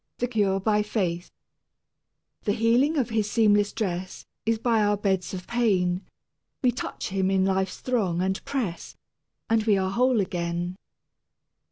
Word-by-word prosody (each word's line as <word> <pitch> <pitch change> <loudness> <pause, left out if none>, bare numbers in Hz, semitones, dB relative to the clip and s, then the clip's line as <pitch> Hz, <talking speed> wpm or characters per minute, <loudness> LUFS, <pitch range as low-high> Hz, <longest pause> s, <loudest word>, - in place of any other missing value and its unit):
XI 245 - 0
THE 245 - -8
CURE 200 -4 +2
BY 210 +1 +2
FAITH 185 -5 -2 1.1
The 205 - +2
healing 240 +8 +3
of 245 -4 0
his 215 -2 0
seamless 205 -2 +3
dress 185 -4 -4 0.2
Is 225 0 +3
by 225 -1 +2
our 205 0 +2
beds 190 -3 0
of 180 -1 -6
pain 190 -6 +1 0.6
We 250 - +4
touch 245 - -5
Him 190 0 0
in 190 -1 +2
life's 190 0 0
throng 205 -9 0
and 190 +1 -1
press, 230 -12 -4 0.5
And 225 -1 +2
we 210 -3 +4
are 190 0 0
whole 250 +2 +3
again. 175 -1 -2
205 Hz, 155 wpm, -26 LUFS, 185-225 Hz, 1.1 s, We